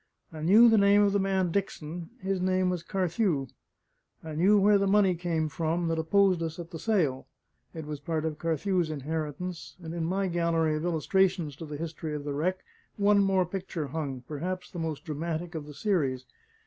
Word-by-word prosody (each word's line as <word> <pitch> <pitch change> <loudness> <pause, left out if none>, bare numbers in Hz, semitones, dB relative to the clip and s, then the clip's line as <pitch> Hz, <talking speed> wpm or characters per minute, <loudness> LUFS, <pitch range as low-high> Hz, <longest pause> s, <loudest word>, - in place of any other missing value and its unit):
I 155 - -7
knew 210 +9 +7
the 225 -2 +5
name 200 +1 +5
of 200 -1 +2
the 200 - +3
man 190 -2 +1
Dickson 170 -3 -3
his 190 -1 -2
name 185 0 +2
was 180 -2 -2
Carthew; 175 -4 0 0.8
I 160 -1 -6
knew 195 +7 +4
where 205 +1 +5
the 200 - +1
money 195 -1 +4
came 165 -2 -1
from 165 +1 -1
that 165 0 0
opposed 185 +2 +3
us 165 -1 -3
at 170 0 -8
the 165 - -6
sale 160 -13 0 0.5
it 160 -2 -6
was 150 -1 -5
part 155 +2 -2
of 155 -2 -3
Carthew's 170 +1 0
inheritance; 155 +4 -4
and 165 -2 -7
in 170 -1 -2
my 190 +3 0
gallery 165 -2 +1
of 155 +2 -3
illustrations 175 -1 +1
to 160 - -7
the 150 -1 -6
history 160 -1 -5
of 145 - -5
the 145 -1 -3
wreck, 180 +6 -1 0.3
one 205 0 +4
more 190 -2 +2
picture 175 -5 -4
hung; 140 -4 -4
perhaps 180 +5 -4
the 175 - -6
most 160 -3 -3
dramatic 165 +2 -4
of 155 -3 -6
the 150 - -9
series. 140 -12 0
170 Hz, 195 wpm, -28 LUFS, 155-190 Hz, 0.8 s, knew